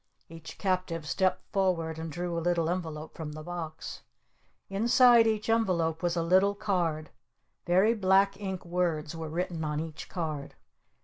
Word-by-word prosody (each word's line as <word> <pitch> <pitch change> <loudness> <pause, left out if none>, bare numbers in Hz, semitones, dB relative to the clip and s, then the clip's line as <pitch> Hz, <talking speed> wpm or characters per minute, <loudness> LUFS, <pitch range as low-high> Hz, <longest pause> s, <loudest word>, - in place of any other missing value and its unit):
Each 160 -1 -10
captive 185 -4 -1
stepped 190 +2 +1
forward 165 -5 0
and 160 0 -5
drew 175 +2 -3
a 170 - -1
little 170 -1 +1
envelope 160 -4 -4
from 155 -2 -6
the 155 0 -8
box. 165 -2 -6 0.7
Inside 235 +3 +5
each 215 -1 0
envelope 180 -8 +1
was 175 -1 0
a 170 - +1
little 190 +4 +4
card. 175 -7 -1 0.6
Very 190 +6 +4
black 195 -1 +3
ink 190 -3 -4
words 170 -3 -1
were 160 -1 -5
written 170 0 -3
on 150 -1 -1
each 160 -1 -6
card. 155 -5 -4
175 Hz, 150 wpm, -29 LUFS, 160-190 Hz, 0.7 s, Inside